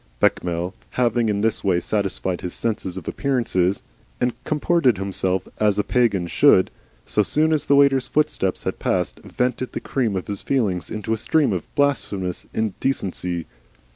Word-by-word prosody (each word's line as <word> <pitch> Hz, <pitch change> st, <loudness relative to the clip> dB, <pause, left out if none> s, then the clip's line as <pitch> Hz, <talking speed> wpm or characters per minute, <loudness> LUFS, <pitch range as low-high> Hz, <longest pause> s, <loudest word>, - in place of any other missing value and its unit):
Bechamel, 90 Hz, +1 st, +1 dB, 0.2 s
having 120 Hz, -2 st, +2 dB
in 100 Hz, -1 st, 0 dB
this 110 Hz, 0 st, 0 dB
way 90 Hz, -3 st, +2 dB
satisfied 95 Hz, -2 st, -2 dB
his 90 Hz, -, -5 dB
sense 115 Hz, -2 st, -2 dB
of -, -, -8 dB
appearances, 115 Hz, -9 st, 0 dB, 0.4 s
and 125 Hz, -1 st, +1 dB
comported 150 Hz, -, +2 dB
himself 95 Hz, -1 st, -1 dB
as 105 Hz, -2 st, +3 dB
a 105 Hz, -, +2 dB
Pagan 110 Hz, -8 st, +2 dB
should, 85 Hz, -, +4 dB, 0.3 s
so 105 Hz, -, +1 dB
soon 155 Hz, +9 st, +2 dB
as 155 Hz, -, 0 dB
the 140 Hz, -, +5 dB
waiter's 140 Hz, -2 st, +4 dB
footsteps 150 Hz, -11 st, 0 dB
had -, -, -3 dB
passed, -, -, -1 dB
vented 125 Hz, 0 st, -2 dB
the -, -, -2 dB
cream 120 Hz, -7 st, -1 dB
of 95 Hz, -, -3 dB
his 100 Hz, -1 st, -5 dB
feelings 105 Hz, -10 st, 0 dB
in 105 Hz, -1 st, -5 dB
a 110 Hz, 0 st, +1 dB
stream 140 Hz, +1 st, +2 dB
of 90 Hz, -, -3 dB
blasphemous 105 Hz, -, 0 dB
indecency. 95 Hz, -6 st, -2 dB
105 Hz, 160 wpm, -22 LUFS, 95-130 Hz, 0.4 s, the